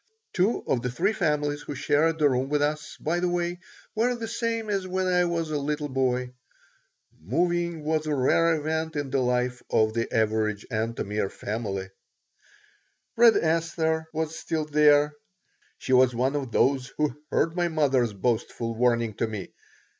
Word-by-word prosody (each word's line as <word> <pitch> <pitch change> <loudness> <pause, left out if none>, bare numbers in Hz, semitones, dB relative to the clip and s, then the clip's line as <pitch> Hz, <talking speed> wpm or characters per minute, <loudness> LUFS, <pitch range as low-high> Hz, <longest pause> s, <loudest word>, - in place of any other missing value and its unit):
Two 195 +5 +1
of 125 - 0
the 125 - -2
three 185 - 0
families 150 -5 0
who 145 - -6
shared 150 +4 +2
the 150 -2 +4
room 130 0 0
with 150 0 +1
us, 150 +1 -2
by 170 +3 -1
the 180 0 0
way, 175 0 -2 0.3
were 235 +3 +1
the 230 -1 -5
same 230 -1 -2
as 195 -2 -1
when 185 0 -1
I 180 -1 +3
was 165 -2 -2
a 150 - 0
little 145 +1 -2
boy. 125 -1 0 0.9
Moving 170 -2 -1
was 155 0 -1
a 150 - 0
rare 165 +5 +3
event 160 +1 -2
in 145 -2 -3
the 135 - +1
life 125 0 0
of 110 0 +2
the 115 0 -2
average 110 -1 0
Antomir 110 -3 -2
family 100 -3 -4 1.3
Red 230 -1 +6
Esther 160 0 0
was 160 0 -3
still 160 -1 -2
there. 150 0 +4 0.6
She 130 - -2
was 125 -1 +5
one 130 +4 0
of 135 -4 -3
those 130 +1 +2
who 150 -4 0
heard 165 +1 +1
my 175 -1 +1
mother's 135 -8 +1
boastful 115 +2 -1
warning 115 -1 +1
to 115 - 0
me. 105 -3 -7
150 Hz, 165 wpm, -26 LUFS, 125-165 Hz, 1.3 s, Red